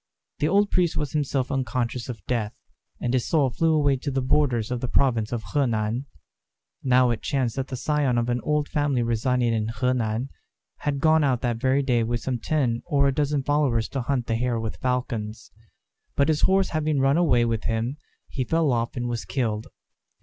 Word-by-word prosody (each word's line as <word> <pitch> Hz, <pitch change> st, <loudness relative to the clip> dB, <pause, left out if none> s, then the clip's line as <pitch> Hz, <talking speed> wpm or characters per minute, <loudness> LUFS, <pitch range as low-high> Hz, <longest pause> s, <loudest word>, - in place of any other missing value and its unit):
The 150 Hz, -, +2 dB
old 200 Hz, +4 st, +3 dB
priest 175 Hz, -3 st, +1 dB
was 150 Hz, -3 st, -2 dB
himself 140 Hz, -3 st, -1 dB
unconscious 125 Hz, -2 st, -2 dB
of 110 Hz, -7 st, -7 dB
death, 115 Hz, -4 st, -2 dB, 0.4 s
and 120 Hz, -, -1 dB
his 125 Hz, -2 st, +1 dB
soul 145 Hz, -6 st, +2 dB
flew 165 Hz, +5 st, +1 dB
away 145 Hz, -3 st, +3 dB
to 140 Hz, +3 st, -4 dB
the 135 Hz, -1 st, -1 dB
borders 130 Hz, -4 st, +1 dB
of 125 Hz, -1 st, -2 dB
the 125 Hz, -, -1 dB
province 115 Hz, -4 st, +1 dB
of 120 Hz, -2 st, -3 dB
Honan. 120 Hz, -2 st, 0 dB, 0.7 s
Now 125 Hz, -1 st, +4 dB
it 115 Hz, -, -3 dB
chanced 130 Hz, -5 st, -1 dB
that 135 Hz, 0 st, -2 dB
the 130 Hz, -, -5 dB
scion 140 Hz, -1 st, 0 dB
of 120 Hz, 0 st, +1 dB
an 120 Hz, 0 st, 0 dB
old 150 Hz, -1 st, 0 dB
family 145 Hz, -5 st, 0 dB
residing 120 Hz, +1 st, +1 dB
in 110 Hz, -1 st, 0 dB
Honan, 125 Hz, 0 st, -1 dB, 0.5 s
had 140 Hz, -2 st, -2 dB
gone 160 Hz, 0 st, +4 dB
out 130 Hz, -4 st, +1 dB
that 120 Hz, -3 st, -1 dB
very 130 Hz, +3 st, +2 dB
day 125 Hz, -3 st, +2 dB
with 115 Hz, 0 st, -1 dB
some 125 Hz, 0 st, -2 dB
ten 125 Hz, -4 st, 0 dB
or 140 Hz, -4 st, +3 dB
a 135 Hz, -, +1 dB
dozen 145 Hz, -1 st, 0 dB
followers 135 Hz, -6 st, +1 dB
to 135 Hz, -, -3 dB
hunt 125 Hz, -1 st, -1 dB
the 115 Hz, -, -1 dB
hare 120 Hz, -1 st, 0 dB
with 110 Hz, -1 st, -4 dB
falcons; 120 Hz, -4 st, -3 dB, 0.6 s
but 140 Hz, +2 st, +2 dB
his 155 Hz, -1 st, +1 dB
horse 190 Hz, 0 st, +3 dB
having 155 Hz, -2 st, 0 dB
run 135 Hz, +3 st, +3 dB
away 140 Hz, -9 st, +3 dB
with 115 Hz, -2 st, -2 dB
him 115 Hz, +5 st, -1 dB, 0.3 s
he 130 Hz, -, -3 dB
fell 160 Hz, +2 st, +1 dB
off 120 Hz, 0 st, -1 dB
and 120 Hz, 0 st, -2 dB
was 120 Hz, -3 st, -3 dB
killed. 105 Hz, +3 st, -2 dB
125 Hz, 200 wpm, -25 LUFS, 115-145 Hz, 0.7 s, Now